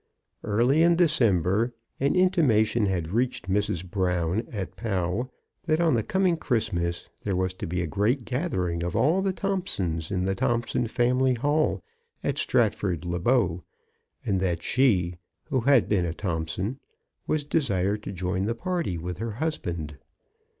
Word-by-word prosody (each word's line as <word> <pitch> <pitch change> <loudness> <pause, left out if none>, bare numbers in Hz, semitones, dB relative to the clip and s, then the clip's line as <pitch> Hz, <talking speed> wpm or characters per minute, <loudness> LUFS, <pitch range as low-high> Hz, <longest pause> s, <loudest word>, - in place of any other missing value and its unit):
Early 120 +9 +3
in 170 +1 +5
December 115 - +2 0.2
an 140 +5 +2
intimation 120 - +3
had 85 -4 -2
reached 120 -4 -1
Mrs. 95 -2 0
Brown 90 +2 0
at 100 -4 -5
Pau 100 +3 -2 0.4
that 155 0 +2
on 165 -3 +3
the 115 - +2
coming 185 - +1
Christ 115 -8 -1
mas 85 0 -2 0.2
there 100 -2 -1
was 95 0 0
to - - -6
be 90 +1 -1
a - - -1
great 110 - 0
gathering 95 - -1
of 85 0 -3
all 155 - +3
the 195 0 +1
Thompsons 140 - -2
in 95 -2 -1
the 95 - +1
Thompson 120 +3 0
family 125 +2 +2
hall 145 - +1 0.4
at - - -1
Stratford 90 -4 +1
le 85 0 -2
Bow, 95 -5 +2 0.6
and 95 -2 +1
that 90 -3 -1
she, 95 -10 +2 0.3
who 130 - +2
had 130 0 +4
been 90 -4 +1
a 80 - -4
Thompson, 95 +7 -3 0.5
was 155 -1 0
desired 105 - 0
to 105 - -6
join 95 +1 -2
the 115 +2 -1
party 170 - -2
with 90 +2 -5
her 115 -1 -3
husband. 85 - -3
105 Hz, 155 wpm, -26 LUFS, 90-130 Hz, 0.6 s, in